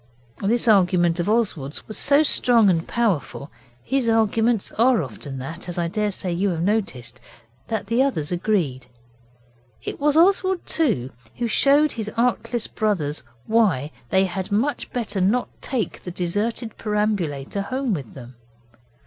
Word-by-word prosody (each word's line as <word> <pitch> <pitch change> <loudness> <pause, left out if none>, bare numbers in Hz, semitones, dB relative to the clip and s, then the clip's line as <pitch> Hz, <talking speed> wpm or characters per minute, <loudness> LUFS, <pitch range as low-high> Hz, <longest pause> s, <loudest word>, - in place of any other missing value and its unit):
This 230 +4 +1
argument 180 -4 +4
of 175 +4 0
Oswald's 185 - -1
was 215 - -5
so 285 +2 +4
strong 235 -8 +4
and 165 -1 -1
powerful 190 -10 -1 0.3
his 260 - 0
arguments 225 0 +2
are 235 -4 +3
often 135 +2 -8
that, 155 +8 -7
as 175 - -5
I 170 -1 0
daresay 200 -2 -2
you 195 +4 0
have 165 -2 -2
noticed 190 - -2 0.5
that 220 -3 -2
the 230 +5 +1
others 215 - 0
agreed. 170 - -1 1.0
It - - -5
was 295 +1 +2
Oswald, 375 +1 +3
too, 180 - 0 0.3
who 240 - -1
showed 285 +6 +4
his 220 -2 -4
artless 240 -1 0
brothers 170 -9 -1 0.2
why 185 - +2 0.2
they 190 +6 +3
had 190 +2 -4
much 245 +9 -1
better 220 -5 -2
not 215 +7 +1
take 235 -9 -3
the - - -7
deserted 205 +6 -2
perambulator 200 -7 -1
home 255 +3 -2
with 140 - -6
them. 125 -2 -10
205 Hz, 145 wpm, -23 LUFS, 170-235 Hz, 1.0 s, argument